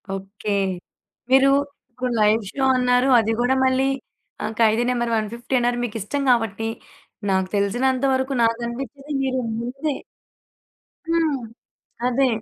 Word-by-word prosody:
Okay. 195 +2 -6 0.8
మీరు 270 +1 +6 0.4
ఇప్పుడు 250 +1 -3
live 215 +2 +4
show 275 - -2
అన్నారు. 250 +1 +3
అది 225 0 0
కూడా 255 +2 +2
మళ్ళీ 260 +1 +2 0.6
ఆహ్, 215 - -2
'ఖైదీ 225 +1 +4
నంబర్ 240 -2 0
150' 235 +4 -4
అన్నారు. 240 0 +1
మీకు 230 -3 -4
ఇష్టం 280 +9 -2
కాబట్టి, 225 -2 0 0.6
నాకు 190 -1 +1
తెలిసినంత 250 +6 +1
వరకు 260 +1 0
నాకనిపించేది 240 +5 -3
మీరు 260 -1 0 0.2
ముందే 270 +5 -3 1.1
హ్మ్, 330 -4 +1 0.7
అదే. 260 +2 +2
245 Hz, 120 wpm, -22 LUFS, 225-265 Hz, 1.1 s, మీరు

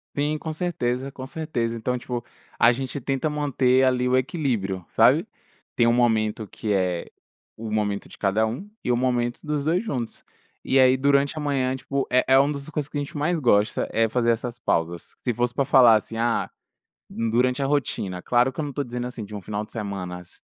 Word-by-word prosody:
Sim, 150 +2 0
com 160 - -5
certeza, 135 -6 -2
com 130 -1 -8
certeza. 130 -7 -3
Então 125 +3 -1
tipo, 120 -1 -4 0.4
a 115 - +7
gente 135 +2 -4
tenta 135 +4 -1
manter 135 -3 +2
ali 125 -1 +2
o 130 - +3
equilíbrio, 120 - -1
sabe. - - +5 0.5
Tem 115 - +3
o 115 - +4
momento 110 -3 +1
que 105 +1 -3
é, 90 -3 -1 0.5
o 110 -1 -6
momento 105 -2 -1
de - - -13
cada 105 +2 +1
um 125 - -5
e 125 - 0
o 120 - +2
momento 120 -1 0
dos 150 -2 -2
2 165 +5 +1
juntos, 125 - -4 0.4
e 135 - +2
aí 130 0 +6
durante 140 +2 +2
a - - -1
manhã 135 -3 0
tipo 135 +1 -2
é 125 - +4
é 130 0 +6
uma 140 +2 +4
das 140 0 -6
coisas 145 -2 -3
que 145 - -5
a - - +1
gente 145 +1 -6
mais 160 +4 0
gosta 105 -6 +2
é 115 -1 +2
fazer 120 0 +2
essas 120 +1 -3
pausas, 85 -3 -2
se 125 - 0
fosse 120 +1 -1
pra 140 - +1
falar 125 -3 +7
assim, 110 +1 -2
ah, 115 0 0 0.6
durante 125 +4 0
a - - +1
rotina, 110 -10 -1
claro 125 +6 +2
que - - -5
eu - - -1
não 145 - -4
estou 140 +1 -3
dizendo, 120 0 -4
assim, 125 -3 -6
de 105 +1 -10
um 105 - -5
final 105 +2 -4
de - - -18
semanas, 90 -5 -6
125 Hz, 210 wpm, -24 LUFS, 110-140 Hz, 0.6 s, a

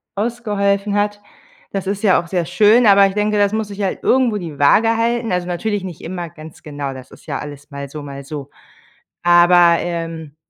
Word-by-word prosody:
ausgeholfen 205 -2 -1
hat. 205 0 -1 0.5
Das 195 -1 -3
ist 200 +2 -3
ja 190 -5 +4
auch 170 - -13
sehr 175 -1 -1
schön, 215 +7 +4
aber 200 0 +7
ich 195 - -5
denke, 210 +1 0
das 205 0 +2
muss 220 -1 -2
sich 200 0 -7
halt 195 -2 -2
irgendwo 250 -5 +2
die 165 -7 -7
Waage 225 +11 +4
halten. 235 0 0
Also 180 -1 -1
natürlich 195 +3 -2
nicht 180 -4 -8
immer 175 0 -6
ganz 160 -1 -13
genau, 145 -2 -5
das 130 0 -12
ist - - -16
ja 140 -3 -3
alles 145 -1 -9
mal 140 0 -6
so, 150 +2 -8
mal 140 -1 -8
so. 145 -1 -7 0.7
Aber, 175 0 +5
ähm, 165 -3 -5
185 Hz, 200 wpm, -18 LUFS, 160-205 Hz, 0.7 s, aber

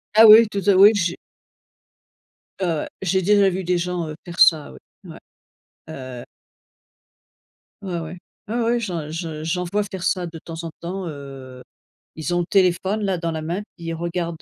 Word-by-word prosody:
Ah 220 +1 +9
oui, 220 +1 +9
tout 200 -1 -3
à 200 - +6
oui. 200 +3 +8
J 175 -3 0 1.5
Ouais, 185 - +1
ouais, 160 -3 -2
j'ai 190 0 +1
déjà 200 +1 +4
vu 185 +1 -3
des 180 0 +1
gens, 175 -1 -3
heu, 155 - -6
faire 175 0 -8
ça, 155 - +5
oui. 65 - -13 0.3
Ouais, - - -11 0.7
heu. 130 -5 -8 1.6
Ouais, 180 -3 -4
ouais. 165 +2 -7 0.3
Ouais, 235 +2 -1
ouais, 235 +1 +1
j'en 170 -7 -4
je 160 -1 -5
j'en 180 +2 -1
vois 205 +4 -1
faire 190 -3 -7
ça 180 -2 0
de 165 -1 -9
temps 165 +1 -8
en 165 - -6
temps, 180 +1 -5
heu, 135 -3 -9 0.5
ils 170 +3 -3
ont - - +2
le 170 - -3
téléphone 190 +2 +1
là 190 -2 0
dans 170 -1 -3
la 160 - -4
main, 170 +6 -3 0.2
puis, 170 - -10
ils 165 - -2
regardent, 170 0 -4
175 Hz, 185 wpm, -22 LUFS, 160-190 Hz, 1.6 s, Ah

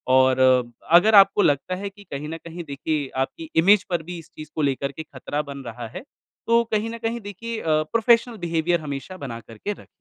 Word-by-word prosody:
और 130 0 +4 0.5
अगर 180 +6 +7
आपको 195 0 +7
लगता 145 +2 +1
है 200 - -2
कि 205 +1 -16
कहीं 150 -5 -6
न 165 - -5
कहीं 170 +1 -7
देखिए 145 0 -2 0.2
आपकी 160 +3 -11
इमेज 190 +5 +6
पर 175 -3 -1
भी 175 +2 -7
इस 165 - -14
चीज़ 155 0 -9
को 155 - -1
लेकर 140 0 0
खतरा 145 0 -4
बन 140 -2 -8
रहा 120 -1 -6
है, 115 - -9 0.4
तो 235 0 +4
कहीं 215 +1 +1
न 230 - -6
कहीं 230 0 -2
देखिए 220 +3 -6
अ, 155 -1 +2
प्रोफ़ेशनल 230 0 +3
बिहेवियर 165 +1 +1
हमेशा 145 +5 -6
बना 130 -8 -6
कर 115 0 -14
के 205 - -3
रखें। - - -16
165 Hz, 210 wpm, -23 LUFS, 140-205 Hz, 0.5 s, अगर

